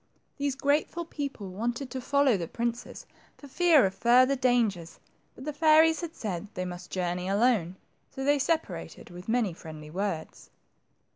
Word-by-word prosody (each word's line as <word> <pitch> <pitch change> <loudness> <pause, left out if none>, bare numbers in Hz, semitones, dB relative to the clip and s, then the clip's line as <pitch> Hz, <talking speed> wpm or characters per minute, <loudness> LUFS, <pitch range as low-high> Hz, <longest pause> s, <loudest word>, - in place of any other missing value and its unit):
These 280 -2 -1
grateful 295 +5 0
people 275 - -6
wanted 240 +7 -3
to 260 - -4
follow 280 -2 +3
the 170 -4 -3
princes 235 +3 -4 0.3
for 285 - -12
fear 315 - +4
of 190 - -1
further 255 +5 +4
dangers, 230 -10 0 0.4
but 260 - -10
the 300 - -3
fairies 315 +1 +5
had 335 -2 -6
said 205 -2 -4
they 185 - -3
must 180 0 -8
journey 180 0 -2
alone, 200 -4 +2 0.3
so 270 - -6
they 285 +1 +3
separated 320 - -3
with 180 +4 -10
many 225 -6 +1
friendly 155 -2 -10
words. 180 -3 -4
240 Hz, 155 wpm, -28 LUFS, 185-280 Hz, 0.4 s, fairies